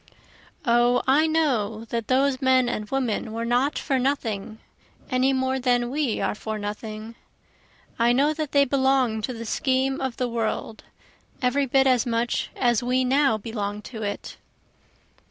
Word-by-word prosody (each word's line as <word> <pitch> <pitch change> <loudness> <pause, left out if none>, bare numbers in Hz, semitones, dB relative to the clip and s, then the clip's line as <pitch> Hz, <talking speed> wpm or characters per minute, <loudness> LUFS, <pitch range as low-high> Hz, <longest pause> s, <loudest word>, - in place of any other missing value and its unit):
O 240 +1 +3
I 295 +4 +4
know 235 -9 0
that 230 -2 -3
those 265 +1 +2
men 260 -1 +4
and 210 -3 -3
women 245 -5 -2
were 230 +1 -3
not 250 +5 +1
for 270 -2 0
nothing, 225 -6 -2 0.5
any 255 +1 +3
more 260 0 0
than 245 -1 +1
we 280 -5 -1
are - - 0
for 215 +1 -5
nothing, 215 +2 -6 0.9
I 235 +1 +4
know 280 +5 +3
that 310 -2 -4
they 280 -1 +4
belong 265 -4 +1
to 255 - -3
the 230 -1 -7
scheme 265 +3 0
of 260 -3 -3
the 250 - 0
world 225 -1 -3 0.6
every 270 +2 +1
bit 265 +1 +3
as 255 -3 +3
much 235 0 -1
as 240 -3 +2
we 255 +1 +1
now 270 -2 +3
belong 210 -1 -5
to 220 -1 -8
it. 205 -1 -5
250 Hz, 155 wpm, -24 LUFS, 225-265 Hz, 0.9 s, I